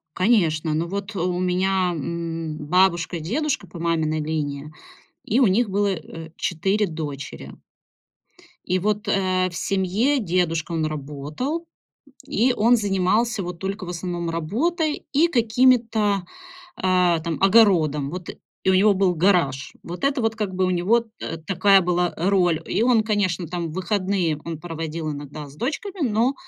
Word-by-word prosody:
Конечно. 170 -7 +2
Но 165 +2 -1
вот 200 +3 -5
у 180 0 -1
меня, 185 0 +1
м, 165 0 -4
бабушка, 175 +2 +1
дедушка 245 - -2
по 170 0 -10
маминой 160 -2 0
линии, 150 -1 -3 0.5
и 235 +6 +2
у 250 - +5
них 215 +4 +2
было, 200 +1 +1
э, 160 -2 -6
4 195 +4 0
дочери. 150 -4 -6 1.1
И 185 0 +1
вот, 210 +2 -1
э, 185 -2 +1
в 175 - -11
семье 200 +10 +1
дедушка, 170 -4 0
он 160 -1 0
работал, 155 - -4 0.6
и 245 +4 +2
он 235 +3 +4
занимался, 205 +2 +1
вот, 175 -1 -6
только 195 +1 -4
в - - -8
основном 175 -1 -3
работой 295 - -1
и 305 +4 +4
какими-то, 225 - +2 0.5
а, 180 -2 +2
там, 160 -3 -3
огородом. 175 -9 +4
Вот, 180 +1 -7 0.4
и 190 - +4
у - - +3
него 200 +2 +5
был 190 -2 +2
гараж. 165 -7 +1
Вот 175 +9 -6
это 275 -2 +1
вот, 225 -1 0
как 205 -4 -3
бы, 185 - +1
у 185 - 0
него 185 +7 +3 0.2
т 165 - -5
такая 195 +1 +5
была, 175 -1 0
э, 175 +4 0
роль. 180 -5 +2
И - - 0
он, 235 -2 +4
конечно, 205 -5 0
там, 170 -2 -4
выходные 185 -3 0
он 165 -2 -5
проводил 165 -1 -4
иногда 145 +1 -8
с 140 - -15
дочками, 320 - -2
но 230 +5 +1
185 Hz, 155 wpm, -23 LUFS, 165-210 Hz, 1.1 s, у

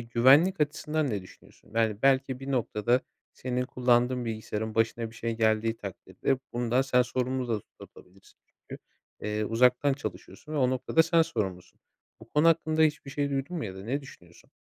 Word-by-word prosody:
güvenlik 135 +10 +4
açısından 150 -1 0
ne 100 -3 -2
düşünüyorsun? 95 - -18
Yani, 110 -2 0
belki, 135 -1 +2
bir 135 +1 -6
noktada, 120 -1 +1 0.3
senin 125 0 -2
kullandığın 125 0 +2
bilgisayarın 110 -1 -4
başına 115 0 0
bir - - -17
şey 115 0 -3
geldiği 110 0 +1
takdirde 105 +6 -3
bundan 120 +2 +1
sen 125 -2 +3
sorumlu 130 0 -2
da 110 -3 0 0.2
tutulabilirsin 95 +2 -17
çünkü, - - -12 0.4
eee, 105 0 -2
uzaktan 125 +5 +3
çalışıyorsun 110 - -7
ve - - -2
o 130 -3 +3
noktada 130 +5 +2
sen 165 0 +3
sorumlusun. 95 - -4 0.4
Bu 110 - -14
konu 150 +5 +4
hakkında 160 -1 +2
hiçbir 150 -3 +1
şey 140 0 -1
duydun 140 +5 -2
mu 160 - -3
ya 95 -3 -6
da 95 - -9
ne 135 +5 -1
düşünüyorsun? 90 -11 -16
125 Hz, 170 wpm, -28 LUFS, 110-140 Hz, 0.4 s, güvenlik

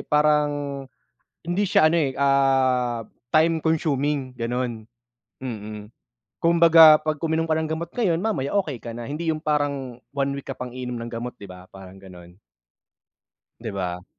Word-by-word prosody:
parang 145 -2 +1 0.6
hindi 175 +4 -1
siya 155 -3 +4
ano, 170 - +1
eh, 135 -4 0
ah, 135 -3 +2 0.3
time 160 +1 +4
consuming 145 -4 0
gano'n, 115 -2 -3 0.5
mm. 105 -4 -7 0.5
Kumbaga 165 -2 +7
'pag 155 -1 -3
uminom 160 0 0
ka 160 - -1
ng 160 0 0
gamot 165 +2 -4
ngayon, 195 -9 +1
mamaya 190 -4 -2
okey 135 -6 -6
ka 115 0 -7
na, 120 - -6
hindi 155 +6 -4
'yung 155 0 -2
parang 140 -5 -1 0.2
1 140 0 0
week 140 0 -7
ka - - -5
pang 125 -1 -7
iinom 125 -1 -5
ng 115 0 -7
gamot, 120 +1 -5
'di - - -12
ba, 90 -1 -12
parang 95 0 -13
gano'n. 90 -1 -14 1.2
Di 115 -2 -5
ba? 90 -2 -4
140 Hz, 155 wpm, -23 LUFS, 120-155 Hz, 1.2 s, Kumbaga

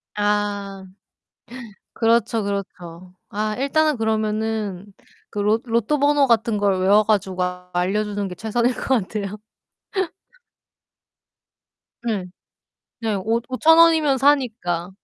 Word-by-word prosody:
아. 205 -2 -1 1.1
그렇죠, 230 -1 +1
그렇죠. 180 -3 -6 0.2
아 215 +1 -2
일단은 295 +1 +1
그러면은 215 -3 -2 0.4
그 205 - -5
로 215 +2 +2
로또 235 +5 0
번호 285 0 +4
같은 230 -2 +2
걸 200 -2 +1
외워 205 +3 +5
가지고 190 -4 0 0.3
알려주는 205 +3 -1
게 180 - -7
최선일 235 +5 0
것 - - -6
같아요. 210 -4 -1 2.7
네. 215 -6 -2 0.8
네 220 -2 -1
오 225 +5 0
오천원이면 320 0 +5
사니까. 235 -11 +1
215 Hz, 205 characters per minute, -22 LUFS, 200-235 Hz, 2.7 s, 외워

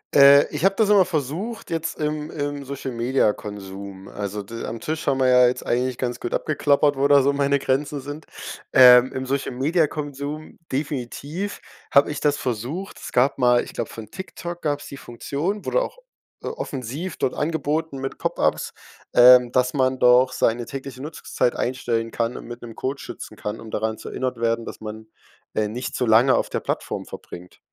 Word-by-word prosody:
Äh, 140 +1 +8
ich 150 - -3
habe 195 +1 +4
das 220 -2 +3
immer 200 -3 +7
versucht 175 - -4
jetzt 165 -1 -3
im 150 0 -2
im 145 -1 -3
Social-Media-Konsum, 105 -7 -3
also, 105 0 -5
d 115 +3 -8
am 115 - -5
Tisch 155 0 -4
haben 135 -1 +1
wir 130 - +3
ja 125 -1 +6
jetzt 125 - -2
eigentlich 125 +1 0
ganz 125 -1 -3
gut 120 - -3
abgeklappert, 145 -1 +2
wo 135 +1 +1
da 140 -1 +7
so 140 +2 +2
meine 140 0 +2
Grenzen 140 +2 -1
sind. 145 +3 -8 0.5
Ähm, 125 -1 +8
im 130 0 -4
Social-Media-Konsum 145 +2 -2
definitiv 145 +7 -4 0.3
habe 140 - +5
ich 145 - -5
das 145 -1 +2
versucht. 130 - -4
Es - - -8
gab 130 +3 +3
mal 125 -1 +4
ich - - -10
glaube 115 - -3
von 110 -2 -9
TikTok 175 +1 -7
gab's 145 -2 -2
die - - -8
Funktion, 145 - -4
wurde - - +2
auch, - - -5 0.4
äh, - - -6
offensiv 145 - -5
dort 130 - 0
angeboten 160 -1 -1
mit 135 0 -5
Pop-Ups, - - 0 0.4
ähm, 125 0 +8
dass 125 0 +2
man 130 -2 +1
doch 125 +1 +5
seine 120 -1 +1
tägliche 135 0 -7
Nutzungszeit 145 -4 -1
einstellen 115 -2 -1
kann 115 +1 -2
und - - -9
mit 120 0 -9
'nem 115 -2 -9
Code 135 +2 -3
schützen - - -8
kann, 105 +1 -5
um 110 -1 -10
daran 110 0 -1
zu - - -10
erinnert 130 -2 -3
werden, 115 0 0
dass - - -8
man, 110 0 -8 0.5
äh, 105 -1 0
nicht 125 +4 -5
zu 125 - 0
lange 115 +4 +5
auf - - 0
der - - -1
Plattform - - -3
verbringt. 90 +1 -11
130 Hz, 180 wpm, -23 LUFS, 120-150 Hz, 0.5 s, Äh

